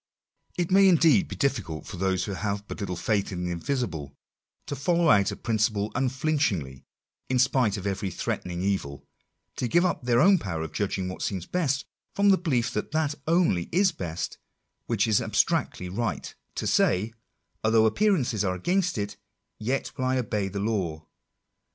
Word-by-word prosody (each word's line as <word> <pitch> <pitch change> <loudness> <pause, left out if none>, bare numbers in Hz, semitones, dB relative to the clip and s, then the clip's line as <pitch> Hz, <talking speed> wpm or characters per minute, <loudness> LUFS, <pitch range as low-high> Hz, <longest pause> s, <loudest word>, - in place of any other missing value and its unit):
It 175 0 -1
may 195 +1 +7
indeed 165 +1 +5
be - - -6
difficult 130 - -1
for 100 - -8
those 95 0 0
who 105 - -4
have 100 +1 -3
but - - -7
little 100 -3 -3
faith 100 +3 0
in 90 -1 -4
the 90 - -2
invisible, 85 - -3 0.5
to 145 - -4
follow 170 +4 +3
out 100 -1 +4
a - - -4
principle 110 -2 0
unflinchingly, 130 - -1 0.4
in 130 - +2
spite 125 -4 +2
of 100 - -7
every 100 0 -2
threatening 90 0 -3
evil 95 -8 -2 0.3
— - - -52
to 125 - -1
give 175 +8 +3
up 170 -4 0
their 120 -1 +3
own 190 +6 +6
power 80 - -3
of 80 - -7
judging 95 -2 -1
what 90 - -6
seems 95 -3 -2
best, 145 -6 -1 0.3
from 200 0 +4
the 195 - +6
belief 135 -10 0
that 105 - -3
that 155 -2 +1
only 160 - +2
is 190 +2 +3
best 85 -2 -5 0.5
which 115 -2 +1
is 110 -2 +3
abstractedly 90 - 0
right 105 +3 -3
— - - -47
to - - -3
say, 105 +5 +2 0.2
" - - -48
although 110 0 +4
appearances 130 - +2
are 95 -2 0
against 180 - 0
it, 100 -1 -3 0.4
yet 125 +5 -2
will 130 - -2
I 130 0 +1
obey 105 -5 -1
the 100 +1 -4
law." 95 -8 -2
110 Hz, 180 wpm, -26 LUFS, 95-140 Hz, 0.5 s, may